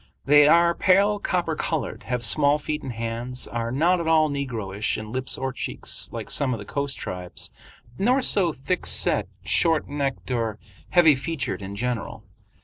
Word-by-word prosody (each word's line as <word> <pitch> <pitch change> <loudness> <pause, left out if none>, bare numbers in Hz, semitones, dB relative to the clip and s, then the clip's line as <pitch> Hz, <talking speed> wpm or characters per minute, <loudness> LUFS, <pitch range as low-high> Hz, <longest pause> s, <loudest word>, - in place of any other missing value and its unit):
They 145 +1 +7
are 170 +2 +5
pale 200 +3 +3
copper 175 -5 -1
colored, 160 -1 -3
have 125 -2 -2
small 145 +5 +4
feet 150 0 -4
and 135 - -5
hands, 115 +2 -3
are 115 0 -3
not 170 +7 +2
at 165 - -4
all 160 -1 +4
negroish 110 -8 -2
in 110 0 -7
lips 130 +1 -1
or 130 0 -3
cheeks - - -2
like - - -6
some 130 -4 +1
of - - -6
the 100 - -9
coast 140 +3 -2
tribes, 90 -1 -5 0.5
nor 250 +6 +2
so 185 -8 +3
thickset, 155 +6 0 0.2
short 165 -3 +1
necked, 140 -2 -3
or 115 -3 -1 0.3
heavy 170 -4 +6
featured 135 -4 -3
in 100 +1 -6
general. 115 -1 -3
140 Hz, 165 wpm, -24 LUFS, 115-160 Hz, 0.5 s, They